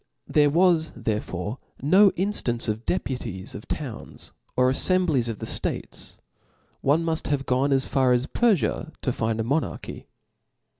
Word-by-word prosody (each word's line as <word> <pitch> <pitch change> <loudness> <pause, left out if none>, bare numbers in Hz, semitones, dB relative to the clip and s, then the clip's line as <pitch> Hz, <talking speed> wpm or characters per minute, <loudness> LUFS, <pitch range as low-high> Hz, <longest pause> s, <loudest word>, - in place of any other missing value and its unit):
There 145 -1 +3
was 165 0 +3
cw's, 120 - -14
therefore 105 0 -3 0.2
no 190 +8 +6
inftance 165 - 0
of 110 +2 -3
deputies 95 +1 -3
of - - -9
towns - - -6 0.3
or 125 0 +4
a£ 130 - +3
fembiies 165 -11 +2
of 110 - -4
the - - -6
ftates; - - -2 0.4
> - - -38 0.3
one 155 +4 +2
cnuil 160 -1 -1
have 140 -2 -1
gone 130 +3 +1
as 135 -1 +3
far 135 -2 +2
^s 125 +1 0
Perfia 195 -7 +1
to 130 - -1
find 115 -2 -1
a - - +1
monarchy. 140 +7 -3
135 Hz, 160 wpm, -25 LUFS, 115-160 Hz, 0.4 s, no